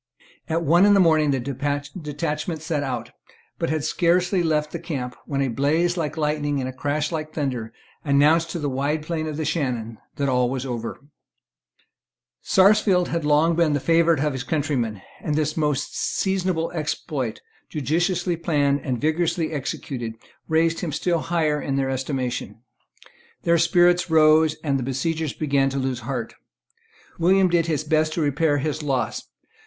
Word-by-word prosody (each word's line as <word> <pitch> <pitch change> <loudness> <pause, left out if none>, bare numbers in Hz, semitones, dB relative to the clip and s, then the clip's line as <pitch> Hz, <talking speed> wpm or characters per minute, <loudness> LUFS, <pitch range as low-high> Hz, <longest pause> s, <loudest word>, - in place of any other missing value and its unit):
At 165 +1 0
one 170 +4 +4
in 205 - +6
the - - +5
morning 155 -4 +4
the 135 -2 +1
detachment 150 +4 -3
set 160 -2 -1
out, 130 -4 -4 0.5
but - - -1
had 155 -1 -1
scarcely 175 +3 +2
left 155 -2 0
the 170 - -4
camp 135 -7 -5
when 140 -1 0
a - - 0
blaze 155 +8 +1
like 160 -3 -3
lightning 150 -2 0
and 130 - -2
a 130 - -5
crash 145 +4 -2
like 155 -1 -4
thunder 125 -7 -2 0.3
announced 150 +3 +3
to 170 - -4
the 150 -3 -2
wide 140 +3 -1
plain 155 0 -3
of 150 -1 -4
the 160 - -2
Shannon 120 -8 -2 0.2
that 140 - -1
all 125 -2 +2
was 130 0 -3
over, 120 -3 -4 1.4
Sarsfield 190 -2 +4
had 170 -2 -1
long 150 +3 +3
been 165 -3 +2
the 145 - +1
favourite 165 +1 +3
of 150 - 0
his 130 -1 -4
countrymen; 135 - -2 0.2
and 150 - -1
this 155 0 0
most 150 -4 -1
seasonable 185 -4 -1
exploit, 150 -6 -3 0.3
judiciously 175 +5 0
planned 145 -4 +1
and 130 -4 -2
vigorously 160 +2 0
executed, 130 -5 -4 0.3
raised 165 +1 +2
him 170 - -3
still 170 +2 0
higher 155 -3 0
in 135 - -2
their 135 -1 0
estimation. 130 -3 -3 0.8
Their 170 0 +3
spirits 175 +1 +3
rose; 155 0 +5
and 140 -3 0
the - - -3
besiegers 150 +4 -2
began 140 -3 +1
to 135 - -4
lose 130 -2 -1
heart. 120 -1 -4 0.9
William 185 +2 +4
did 170 -1 +2
his 155 -2 0
best 155 0 +1
to 165 - -1
repair 145 +1 +2
his 150 +2 -2
loss. 135 -3 -2
150 Hz, 165 wpm, -23 LUFS, 135-165 Hz, 1.4 s, in